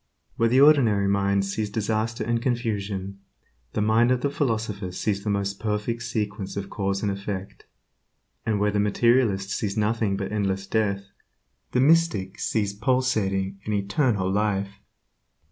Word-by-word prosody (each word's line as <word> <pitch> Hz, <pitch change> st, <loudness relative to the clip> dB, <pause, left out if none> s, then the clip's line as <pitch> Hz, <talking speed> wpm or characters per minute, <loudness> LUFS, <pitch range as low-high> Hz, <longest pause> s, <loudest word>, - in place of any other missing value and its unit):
Where 115 Hz, -, +2 dB
the 130 Hz, +3 st, +4 dB
ordinary 120 Hz, -10 st, +5 dB
mind 100 Hz, 0 st, +2 dB
sees 105 Hz, +2 st, -2 dB
disaster 110 Hz, +2 st, -1 dB
and 115 Hz, +1 st, 0 dB
confusion, 100 Hz, -6 st, -2 dB, 0.5 s
the 105 Hz, -, 0 dB
mind 110 Hz, +3 st, +4 dB
of 125 Hz, -1 st, +2 dB
the 140 Hz, -, 0 dB
philosopher 110 Hz, -8 st, -2 dB
sees 100 Hz, +2 st, -2 dB
the 105 Hz, -, -2 dB
most 100 Hz, -1 st, -1 dB
perfect 110 Hz, +2 st, -2 dB
sequence 105 Hz, -4 st, -3 dB
of 100 Hz, -1 st, -5 dB
cause 100 Hz, -1 st, -2 dB
and 105 Hz, -, +1 dB
effect, 100 Hz, -1 st, -6 dB, 0.8 s
and 110 Hz, -2 st, 0 dB
where 105 Hz, 0 st, +2 dB
the 105 Hz, -, 0 dB
materialist 105 Hz, -1 st, +2 dB
sees 100 Hz, -1 st, -2 dB
nothing 105 Hz, -2 st, +1 dB
but 100 Hz, 0 st, -4 dB
endless 95 Hz, -2 st, -1 dB
death, 100 Hz, -1 st, 0 dB, 0.7 s
the 125 Hz, -, +2 dB
mystic 155 Hz, -, +2 dB
sees 105 Hz, -2 st, 0 dB
pulsating 100 Hz, -5 st, 0 dB
and 105 Hz, -, -1 dB
eternal 100 Hz, 0 st, +1 dB
life. 100 Hz, 0 st, -1 dB
105 Hz, 145 wpm, -25 LUFS, 100-115 Hz, 0.8 s, ordinary